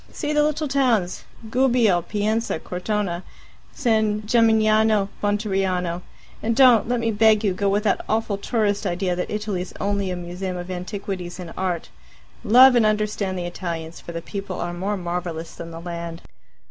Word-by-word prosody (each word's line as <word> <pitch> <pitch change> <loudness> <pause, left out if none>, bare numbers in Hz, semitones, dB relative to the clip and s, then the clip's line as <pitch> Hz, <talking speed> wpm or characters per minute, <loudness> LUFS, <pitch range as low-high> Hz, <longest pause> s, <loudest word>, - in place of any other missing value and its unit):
See 295 - -3
the 300 - +4
little 305 0 0
towns 240 -10 +1 0.3
Gubbio, 240 -8 +3
Pienza, 215 +3 -1
Cortona, 180 +1 -2 0.5
San 220 -5 +1
Gemignano, 220 -2 +3
Monteriano. 195 -4 0 0.4
And 230 +1 0
don't, 250 -5 +6
let 245 0 0
me 230 -1 0
beg 220 0 +4
you, 200 -3 +2
go 200 +2 0
with 205 +1 +1
that 210 - +1
awful 215 -2 0
tourist 205 -2 0
idea 180 +1 -1
that 180 - -3
Italy's 210 -4 -3
only 200 -1 -1
a 180 - -2
museum 180 +1 -5
of 175 +1 -6
antiquities 185 0 -5
and 175 -2 -7
art. 180 -3 -2 0.5
Love 255 +4 +8
and 240 -2 +4
understand 210 -3 0
the 175 - -3
Italians, 170 -2 -5
for - - -9
the 165 -1 -5
people 195 -3 -5
are 175 0 -3
more 195 +4 -2
marvellous 175 -2 -4
than 170 - -8
the 165 0 -8
land." 170 -1 -6
200 Hz, 160 wpm, -23 LUFS, 180-220 Hz, 0.5 s, Love